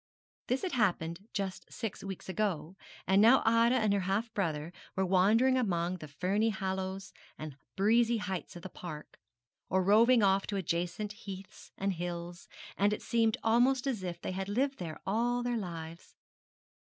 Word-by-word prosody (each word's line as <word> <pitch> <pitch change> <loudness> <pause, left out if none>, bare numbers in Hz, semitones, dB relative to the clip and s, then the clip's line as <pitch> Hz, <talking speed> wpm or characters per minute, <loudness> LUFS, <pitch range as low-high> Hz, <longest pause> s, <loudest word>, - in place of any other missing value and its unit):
This 255 +2 0
had 370 - -1
happened 185 -5 0
just 195 -6 -4
six 225 -4 -5
weeks 195 -2 -7
ago, 185 -4 -2 0.3
and 195 +1 +4
now 235 +5 +6
Ida 230 +2 +4
and 215 -5 +2
her 200 - +2
half 195 +5 -1
brother 160 -4 -2 0.2
were 190 - +1
wandering 215 +8 +4
about 250 - +2
among 175 0 -1
the 155 - -9
ferny 190 +9 0
hollows 190 -1 -3 0.2
and 155 -3 -7 0.2
breezy 230 +4 +3
heights 190 -7 -4
of 175 - -9
the 190 - -6
park, 155 -4 -9 0.5
or 190 +1 +2
roving 225 +4 +5
off 195 0 +3
to 205 - -3
adjacent 175 +3 -2
heaths 195 -2 -10
and 195 0 0
hills, 175 0 -5 0.3
and 205 +1 +4
it - - -5
seemed 225 -2 +2
almost 245 +4 +3
as 255 -7 -1
if 175 -2 -4
they - - -4
had 190 +1 -4
lived 270 +6 0
there 165 -4 -6
all 240 +4 +1
their 245 -1 0
lives. 170 -3 -8
195 Hz, 170 wpm, -31 LUFS, 180-225 Hz, 0.5 s, now